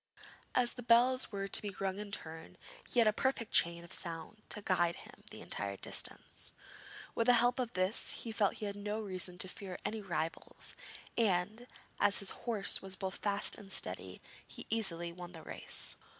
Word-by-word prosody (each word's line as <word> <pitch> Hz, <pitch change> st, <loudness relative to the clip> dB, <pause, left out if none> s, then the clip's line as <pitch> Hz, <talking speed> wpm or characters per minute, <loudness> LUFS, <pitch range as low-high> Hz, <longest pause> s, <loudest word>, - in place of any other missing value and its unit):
As 245 Hz, -1 st, +3 dB
the 250 Hz, -, -8 dB
bells 245 Hz, +2 st, +4 dB
were 195 Hz, -1 st, -3 dB
to -, -, +3 dB
be 205 Hz, -2 st, -5 dB
rung 195 Hz, 0 st, -2 dB
in 210 Hz, -1 st, -6 dB
turn, 160 Hz, -, -5 dB, 0.3 s
he -, -, -4 dB
had 230 Hz, -2 st, +6 dB
a 215 Hz, -, +4 dB
perfect 260 Hz, -1 st, 0 dB
chain 170 Hz, 0 st, +3 dB
of 170 Hz, -, -10 dB
sound 170 Hz, +4 st, +3 dB
to -, -, +1 dB
guide 175 Hz, -3 st, +2 dB
him -, -, -13 dB
the -, -, -9 dB
entire 100 Hz, -1 st, -3 dB
distance. -, -, 0 dB, 0.6 s
With 230 Hz, -, 0 dB
the 245 Hz, -, +8 dB
help 245 Hz, +2 st, +3 dB
of 245 Hz, -2 st, -2 dB
this, 185 Hz, +4 st, 0 dB
he 230 Hz, -, -4 dB
felt 210 Hz, -3 st, +1 dB
he 215 Hz, -, -5 dB
had 200 Hz, -1 st, -3 dB
no 205 Hz, +1 st, -3 dB
reason 185 Hz, -3 st, 0 dB
to 185 Hz, -, +3 dB
fear 185 Hz, -1 st, -7 dB
any 220 Hz, 0 st, -2 dB
rivals, 165 Hz, -4 st, -4 dB, 0.5 s
and, 215 Hz, +3 st, +1 dB, 0.3 s
as 200 Hz, -, +4 dB
his 200 Hz, -, +1 dB
horse 220 Hz, -5 st, +4 dB
was 190 Hz, -1 st, -3 dB
both 190 Hz, 0 st, -4 dB
fast 205 Hz, -1 st, -1 dB
and 200 Hz, -2 st, -11 dB
steady, 90 Hz, -, -2 dB, 0.3 s
he -, -, -8 dB
easily 175 Hz, -6 st, 0 dB
won 175 Hz, 0 st, -9 dB
the 160 Hz, -2 st, -9 dB
race. -, -, -3 dB
200 Hz, 190 wpm, -34 LUFS, 175-225 Hz, 0.6 s, the